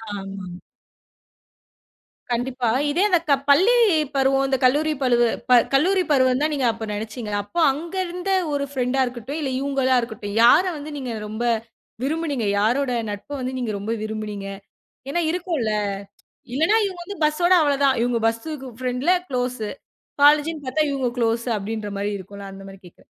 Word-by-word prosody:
ஆமா. 195 -2 -7 1.7
கண்டிப்பா. 245 0 -1 0.2
இதேது 365 +3 +3
க - - +6 0.2
பள்ளி 380 +13 +6 0.4
பருவம் 270 0 +3
இந்த 265 -1 +1
கல்லூரி 300 +4 +3
பழுவு 240 -2 +3 0.2
ப - - +1 0.2
கல்லூரி 365 +7 +3
பருவம் 260 -1 +3
தான் 305 +1 +1
நீங்க 270 -3 0
அப்ப 225 0 -6
நினைச்சீங்களா? 215 -1 -4
அப்ப 340 +12 -4
அங்க 330 +6 -7
இருந்த 360 +2 -4 0.2
ஒரு 280 0 0
ஃப்ரெண்ட்டா 260 0 0
இருக்கட்டும் 250 +5 -6
இல்ல, 270 -2 -2
இவங்களா 270 -2 +1
இருக்கட்டும், 210 -3 -6
யார 300 +9 +7
வந்து 295 +1 -7
நீங்க 255 -4 -4
ரொம்ப 220 +3 -4 0.6
விரும்பினீங்க? 290 -6 -1
யாரோட 250 +5 +1 0.2
நட்ப 205 +8 -8
வந்து 255 +1 -3
நீங்க 235 -3 -2
ரொம்ப 215 +3 -4
விரும்பினீங்க. 215 -2 -5 0.6
ஏன்னா 345 +4 0
இருக்கும்ல. 330 - -1 0.8
இல்லன்னா 325 +10 +3
இவங்க 370 -3 -5
வந்து 405 -1 -7
பஸ்ஸோட 345 +4 +3
அவ்ளோ 285 -1 +2
தான். 265 -2 +3
இவங்க 240 -1 0
பஸ் 225 0 -1 0.4
ஃப்ரெண்ட்ல 255 +7 +1 0.2
க்ளோஸ். 250 -2 -2 0.6
காலேஜ்ன்னு 300 0 +4
பாத்தா, 310 +4 0
இவங்க 265 -3 0
க்ளோஸ் 230 +1 +1
அப்டின்ற 210 0 -4
மாரி 205 +1 -1
இருக்கும்ல. 200 +1 -10
அந்த 195 0 -11
மாரி 195 0 -11
கேட்குறேன். 175 - -17
255 Hz, 150 wpm, -22 LUFS, 225-295 Hz, 1.7 s, யார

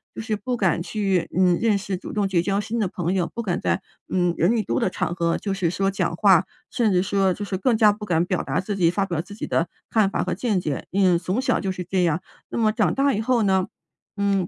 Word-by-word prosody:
就 - - -5
是 220 -1 -2
不 250 +4 -3
敢 175 -4 +1
去， 195 -3 0
嗯， 180 -2 +4
认 220 -3 +3
识 195 -1 -4
主 - - -8
动 205 -2 +1
结 180 -3 +1
交 195 +2 0
新 230 +3 -3
的 205 - +1
朋 175 0 -2
友， 180 -3 0
不 235 - -3
敢 180 -3 -1
在 - - 0 0.3
嗯， 175 -2 +1
人 190 +8 +3
一 215 - 0
多 120 -5 -1
的 - - +1
场 175 - -2
合 170 -1 0
就 200 -2 -3
是 185 -4 0
说 195 +2 0
讲 180 -3 -1
话， 190 -2 +5 0.3
甚 230 -5 +1
至 180 0 +3
说 195 -1 +1
就 205 - -6
是 190 -2 -3
更 230 +5 +2
加 215 -2 +6
不 210 +1 -6
敢 170 -3 +2
表 185 0 -1
达 - - -1
自 205 +2 -3
己 175 -4 +3
发 195 +1 0
表 170 -4 -2
自 205 +3 -11
己 - - -5
的 165 - +1 0.2
看 215 -3 +3
法 - - -1
和 - - -2
见 215 -7 0
解， 145 -5 -3
因 195 +1 +2
为 170 - +4
从 185 +7 -1
小 - - +1
就 190 -2 -2
是 180 -1 -5
这 185 +1 0
样。 165 0 +1 0.3
那 - - -4
么 220 -2 +3
长 215 -1 +1
大 275 0 +2
以 215 - -1
后 235 -1 +2
呢， 190 -2 +2 0.5
嗯， 200 -3 +1
195 Hz, 290 characters per minute, -23 LUFS, 180-210 Hz, 0.5 s, 加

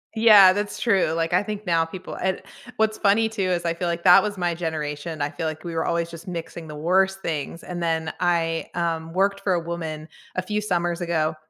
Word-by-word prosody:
Yeah. 210 -4 +8
That's 205 +1 -3
true, 195 -8 +2
like, 165 +1 -1
I 180 - +4
think 210 0 -6
now 165 -2 +2
people 185 +2 -8
and 190 0 -1 0.4
what's 215 0 +1
funny 220 +2 +3
too 215 -2 -4
is 175 -1 -1
I 170 - +1
feel 175 +1 -3
like 170 0 -2
that 180 -1 +8
was 205 -2 -3
my 175 -1 0
generation. 155 -1 -4
I 145 - -1
feel 165 -2 -3
like 155 0 -5
we 170 -1 -5
were 160 - -1
always 170 0 -1
just 165 +1 -11
mixing 170 -2 -6
the 150 - -8
worst 190 +5 +1
things 160 0 -4
and 175 -1 -6
then 160 -1 -1
I, 165 -2 0
um, 165 -1 -2
worked 195 +2 +1
for 195 -2 0
a 175 - +1
woman 160 -2 -5 0.3
a 185 - -1
few 210 +2 -2
summers 175 -3 -1
ago, 160 -2 0
170 Hz, 225 wpm, -24 LUFS, 165-190 Hz, 0.4 s, Yeah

